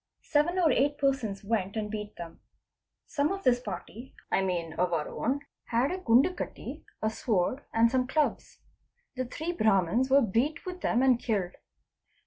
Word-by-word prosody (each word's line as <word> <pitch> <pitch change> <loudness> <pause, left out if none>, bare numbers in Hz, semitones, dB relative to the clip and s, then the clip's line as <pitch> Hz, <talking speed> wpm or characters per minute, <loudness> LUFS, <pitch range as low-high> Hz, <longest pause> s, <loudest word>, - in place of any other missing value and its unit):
Seven 310 +5 +1
or 335 -5 +4
eight 285 +3 +2
persons 265 -9 0
went 200 -2 -1
and 210 -1 -3
beat 210 -1 -5
them. 170 -1 -9 0.7
Some 295 +2 0
of 390 0 -4
this 245 -1 +4
party 220 +3 -8 0.2
(I - - +3
mean 175 -4 -2
— - - -10
of 180 -1 +1
our 155 -2 0
own) 270 +4 -2 0.2
had 240 +6 +1
a 370 - -3
gandkatti, 275 +5 +1 0.2
a 220 - +3
sword, 220 +3 0
and 230 +1 +4
some 255 -1 +1
clubs. 305 +2 -1 0.6
The 255 0 -2
three 315 +7 -4
Brahmans 215 - +2
were 275 +1 +6
beaten 235 +9 0
with 365 0 -6
them 240 +3 +2
and 255 -3 +4
killed. 200 -7 -1
240 Hz, 170 wpm, -29 LUFS, 205-280 Hz, 0.7 s, were